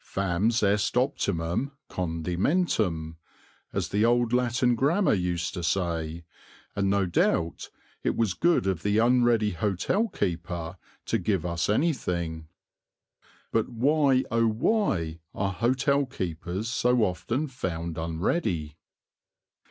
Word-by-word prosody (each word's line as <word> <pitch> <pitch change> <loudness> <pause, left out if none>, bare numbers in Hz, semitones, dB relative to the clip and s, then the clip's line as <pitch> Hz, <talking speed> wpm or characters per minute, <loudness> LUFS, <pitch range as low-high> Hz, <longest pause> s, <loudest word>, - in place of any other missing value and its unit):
Fames 100 +5 0
est 105 +4 +2
optimum 100 - -1
condimentum, 90 - -1 0.5
as - - -2
the 105 +2 +1
old 120 0 +3
Latin 125 0 +2
Grammar 150 - +2
used 90 -2 -1
to 90 - -4
say, 85 -2 -2 0.5
and 100 -1 +1
no 100 -1 +2
doubt 85 -1 0 0.3
it - - 0
was 110 -5 +1
good 170 - +2
of 95 -4 0
the 105 +1 +1
unready 120 -2 +3
hotel 100 - 0
keeper 85 - -3 0.3
to - - +1
give - - 0
us 85 0 -1
anything. 90 - -1 1.0
But 115 - +1
why, 135 +2 +3
O 115 0 +3
why, 110 - 0 0.2
are 100 -1 -1
hotel 130 +6 +1
keepers 95 - -4
so 120 +1 +2
often 115 +9 -1
found 85 - -4
unready? 80 - -1
100 Hz, 115 wpm, -27 LUFS, 85-125 Hz, 1.0 s, old